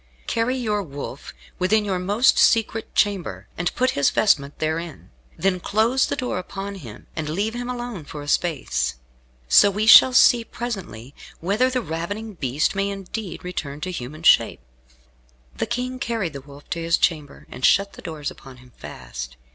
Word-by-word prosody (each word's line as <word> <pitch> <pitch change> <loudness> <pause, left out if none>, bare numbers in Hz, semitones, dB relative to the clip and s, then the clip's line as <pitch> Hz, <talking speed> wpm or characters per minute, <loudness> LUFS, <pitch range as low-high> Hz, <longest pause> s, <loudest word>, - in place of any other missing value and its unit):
Carry 235 +3 0
your 210 -4 -1
wolf 140 -5 -8 0.3
within 210 +4 +2
your 190 -3 -1
most 205 +7 +3
secret 225 0 +2
chamber, 200 -4 0
and 175 +1 -1
put 255 +1 +2
his 140 - +2
vestment 145 -9 +1
therein. 160 +1 -4 0.3
Then 185 +2 +1
close 225 +8 +2
the - - -2
door 250 -7 -2
upon 195 +2 -6
him, 115 -7 -11
and 155 -1 -3
leave 200 +8 -1
him 245 +1 -5
alone 240 -9 -5
for 145 0 -8
a - - -10
space. 70 - 0 0.5
So 200 - +7
we 210 +2 -1
shall 240 +3 +9
see 245 -2 +6
presently 185 - -6 0.3
whether 205 +9 +1
the 255 -2 -1
ravening 205 +7 -5
beast 140 -3 -1
may 195 0 -1
indeed 195 -1 -6
return 150 -5 -5
to 185 - -3
human 155 0 -7
shape." 165 - +4 1.0
The - - -2
King 250 +2 -3
carried 225 -9 -2
the 140 - -7
Wolf 140 +1 -15
to 170 - -2
his 165 +1 +2
chamber, 150 -4 -1
and 130 - -9
shut 200 +6 +4
the - - -12
doors 155 -4 -5
upon 130 -1 -13
him 125 0 -18
fast. - - -8
185 Hz, 170 wpm, -23 LUFS, 145-220 Hz, 1.0 s, shall